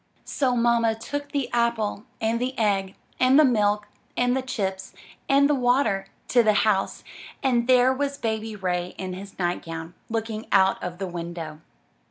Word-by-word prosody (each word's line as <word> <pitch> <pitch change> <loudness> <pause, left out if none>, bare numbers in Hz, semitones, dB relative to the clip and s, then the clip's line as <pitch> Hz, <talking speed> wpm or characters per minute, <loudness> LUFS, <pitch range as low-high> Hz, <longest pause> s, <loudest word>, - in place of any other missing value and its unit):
So 260 -3 0
mamma 235 -1 +3
took 285 +6 -5
the 280 -2 -1
apple 235 -2 0
and 230 +1 0
the 255 +1 -2
egg 195 -3 0 0.2
and 255 +3 +5
the 310 - +7
milk 210 -4 +2 0.3
and 245 +1 +2
the 265 - 0
chips 195 -7 -4 0.3
and 280 +1 +5
the 295 - +2
water 245 -7 +2 0.2
to 245 - +5
the 215 -2 +3
house, 195 -3 0 0.4
and 245 -3 +2
there 255 0 +5
was 280 +1 -2
Baby 220 -2 -3
Ray 180 -2 -2
in 185 -1 -4
his 195 +2 -9
nightgown, 165 -2 -3 0.2
looking 225 -1 -3
out 190 -1 +4
of 175 -1 -5
the 195 - -3
window. 170 -3 -6
220 Hz, 165 wpm, -25 LUFS, 190-250 Hz, 0.4 s, the